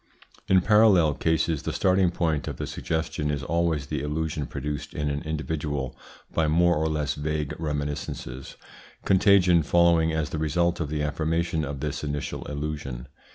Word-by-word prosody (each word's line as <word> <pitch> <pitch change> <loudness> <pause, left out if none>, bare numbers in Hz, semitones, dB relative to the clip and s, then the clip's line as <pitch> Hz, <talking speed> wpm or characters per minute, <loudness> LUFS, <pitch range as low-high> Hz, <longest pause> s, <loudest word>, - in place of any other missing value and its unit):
In 95 -1 +5
parallel 100 -6 +5
cases 80 0 0
the - - -3
starting 95 -1 +3
point 80 -4 -1
of - - -4
the - - -3
suggestion 80 -2 -2
is 70 -1 -2
always 80 -2 0
the 70 0 -3
illusion 75 0 -2
produced 75 +1 -5
in 75 -1 -1
an 70 0 -3
individual 75 -3 -3 0.4
by 80 -1 +2
more 85 +3 +4
or 80 +1 0
less 75 -2 -1
vague 75 0 -2
reminiscences, 75 -4 -4 0.5
contagion 95 -3 +5
following 85 0 +3
as 80 -1 -2
the 80 - -3
result 85 +3 +1
of 80 -4 -2
the 75 -1 -1
affirmation 80 +2 -1
of 70 -1 -5
this 75 0 -3
initial 75 -1 -4
illusion. 70 -4 -5
75 Hz, 155 wpm, -26 LUFS, 75-85 Hz, 0.5 s, In